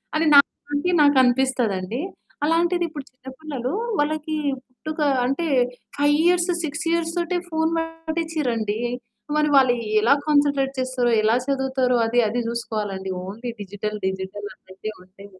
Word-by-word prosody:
అని 320 Hz, -, +2 dB
నాకంటే 290 Hz, +3 st, +3 dB
నాకనిపిస్తదండి. 250 Hz, -5 st, +2 dB, 0.4 s
అలాంటిదిప్పుడు 335 Hz, -2 st, 0 dB
చిన్న 255 Hz, +1 st, -21 dB
పిల్లలూ, 275 Hz, -5 st, -4 dB, 0.3 s
వాళ్ళకి 310 Hz, +1 st, -1 dB, 0.3 s
పుట్టుక 310 Hz, +5 st, -8 dB, 0.3 s
అంటే 275 Hz, +6 st, -1 dB, 0.5 s
5 290 Hz, +1 st, +4 dB
ఇయర్స్, 355 Hz, 0 st, +3 dB
6 310 Hz, +1 st, -3 dB
ఇయర్స్ 335 Hz, -1 st, 0 dB
తోటే 345 Hz, +1 st, 0 dB
ఫోను 320 Hz, 0 st, 0 dB
వాడిచ్చిర్రండి. 320 Hz, -9 st, -2 dB, 0.6 s
మరి 300 Hz, 0 st, +3 dB
వాళ్ళు 260 Hz, -2 st, +6 dB, 0.3 s
ఎలా 235 Hz, +5 st, +5 dB
కాన్సంట్రేట్ 285 Hz, -2 st, +2 dB
చేస్తారో, 255 Hz, -2 st, 0 dB
ఎలా 220 Hz, +2 st, +4 dB
చదువుతారో, 265 Hz, -2 st, +1 dB
అది 240 Hz, +1 st, +3 dB
అది 240 Hz, +2 st, -1 dB
చూసుకోవాలండి. 210 Hz, -5 st, -3 dB
ఓన్లీ 230 Hz, +5 st, -6 dB
డిజిటల్ 210 Hz, +2 st, -4 dB
డిజిటల్ 190 Hz, +2 st, -4 dB
అన్నట్టే 190 Hz, +3 st, -8 dB
ఉంటే 190 Hz, +2 st, -15 dB
265 Hz, 120 wpm, -23 LUFS, 230-310 Hz, 0.6 s, వాళ్ళు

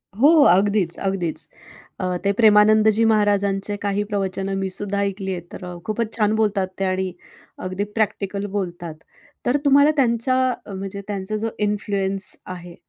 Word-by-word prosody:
हो, 265 Hz, +8 st, +5 dB, 0.2 s
अगदीच, 195 Hz, -2 st, +2 dB
अगदीच. 180 Hz, -4 st, 0 dB, 0.5 s
अ, 185 Hz, -, -2 dB, 0.2 s
ते 200 Hz, -, +4 dB
प्रेमानंदजी 215 Hz, 0 st, +5 dB
महाराजांचे 205 Hz, -1 st, +1 dB
काही 200 Hz, +1 st, 0 dB
प्रवचनं 195 Hz, -1 st, -2 dB
मी 195 Hz, 0 st, -2 dB
सुद्धा 200 Hz, +1 st, -2 dB
ऐकलीय 195 Hz, -1 st, -3 dB
आहेत. 175 Hz, 0 st, -9 dB
तर -, -, -8 dB
अ, 180 Hz, 0 st, -7 dB
खूपच 220 Hz, +1 st, -2 dB
छान 215 Hz, -1 st, +2 dB
बोलतात 210 Hz, -3 st, +1 dB
ते 195 Hz, -, +1 dB
आणि 185 Hz, 0 st, -1 dB, 0.5 s
अगदी 185 Hz, +2 st, -2 dB
प्रॅक्टिकल 200 Hz, -2 st, -1 dB
बोलतात. 175 Hz, -4 st, -5 dB, 0.5 s
तर 250 Hz, +4 st, +2 dB
तुम्हाला 285 Hz, +2 st, +6 dB
त्यांचा 245 Hz, 0 st, +2 dB, 0.3 s
म्हणजे 195 Hz, 0 st, -6 dB
त्यांचा 200 Hz, 0 st, -3 dB
जो 225 Hz, -, 0 dB, 0.2 s
इन्फ्लुअन्स 195 Hz, -2 st, -1 dB, 0.2 s
आहे, 175 Hz, -1 st, -11 dB
200 Hz, 145 wpm, -22 LUFS, 190-215 Hz, 0.5 s, तुम्हाला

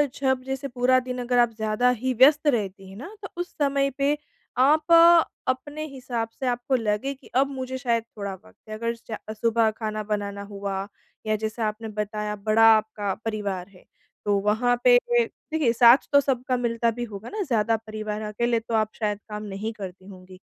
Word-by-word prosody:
जब 265 Hz, -1 st, 0 dB
जैसे 270 Hz, +1 st, -4 dB
पूरा 255 Hz, 0 st, +3 dB
दिन 250 Hz, 0 st, -5 dB
अगर 245 Hz, 0 st, +1 dB
आप 240 Hz, -1 st, +4 dB
ज़्यादा 220 Hz, +3 st, +1 dB
ही 250 Hz, +1 st, 0 dB
व्यस्त 290 Hz, +5 st, +5 dB
रहती 200 Hz, -7 st, -1 dB
हैं 190 Hz, -, -11 dB
ना, 340 Hz, -, -9 dB
तो 390 Hz, -, -6 dB
उस 355 Hz, -, -6 dB
समय 275 Hz, -1 st, +2 dB
पे 285 Hz, +1 st, +1 dB, 0.4 s
आप 300 Hz, +6 st, +3 dB, 0.6 s
अपने 290 Hz, +4 st, -2 dB
हिसाब 250 Hz, -5 st, -4 dB
से 265 Hz, -, -2 dB
आपको 245 Hz, +2 st, 0 dB
लगे 225 Hz, +3 st, -1 dB
कि 270 Hz, -1 st, -18 dB
अब 270 Hz, +2 st, +4 dB
मुझे 260 Hz, -1 st, -4 dB
शायद 235 Hz, -3 st, 0 dB
थोड़ा 200 Hz, -1 st, -4 dB
वक़्त 95 Hz, -, -16 dB
है, -, -, -5 dB
अगर 230 Hz, +2 st, -2 dB
च 230 Hz, -1 st, -8 dB, 0.2 s
सुबह 225 Hz, 0 st, +2 dB
खाना 215 Hz, -1 st, -4 dB
बनाना 205 Hz, -1 st, -3 dB
हुआ 200 Hz, -1 st, -4 dB, 0.4 s
या 215 Hz, 0 st, +1 dB
जैसा 220 Hz, +1 st, -2 dB
आपने 215 Hz, +1 st, -5 dB
बताया, 210 Hz, 0 st, -3 dB
बड़ा 215 Hz, +2 st, +3 dB
आपका 210 Hz, -2 st, -3 dB
परिवार 200 Hz, -5 st, -3 dB
है, 185 Hz, -2 st, -19 dB, 0.4 s
तो 205 Hz, -1 st, +2 dB
वहाँ 220 Hz, +5 st, +2 dB
पे -, -, +7 dB, 0.6 s
देखिए, 305 Hz, -7 st, +2 dB
साथ 235 Hz, +1 st, +8 dB, 0.2 s
तो 285 Hz, -, +8 dB
सबका 255 Hz, -2 st, -1 dB
मिलता 235 Hz, -1 st, 0 dB
भी 240 Hz, +2 st, -5 dB
होगा 215 Hz, 0 st, -9 dB
ना, 430 Hz, -, -4 dB
ज़्यादा 230 Hz, -, +1 dB
परिवार 215 Hz, -1 st, -5 dB
अकेले 230 Hz, +2 st, 0 dB
तो 230 Hz, +1 st, -8 dB
आप 215 Hz, -1 st, +2 dB
शायद 210 Hz, -2 st, -2 dB
काम 210 Hz, 0 st, -5 dB
नहीं 205 Hz, +2 st, -4 dB
करती 190 Hz, -3 st, -9 dB
होंगी। 185 Hz, -1 st, -13 dB
225 Hz, 185 wpm, -25 LUFS, 210-255 Hz, 0.6 s, साथ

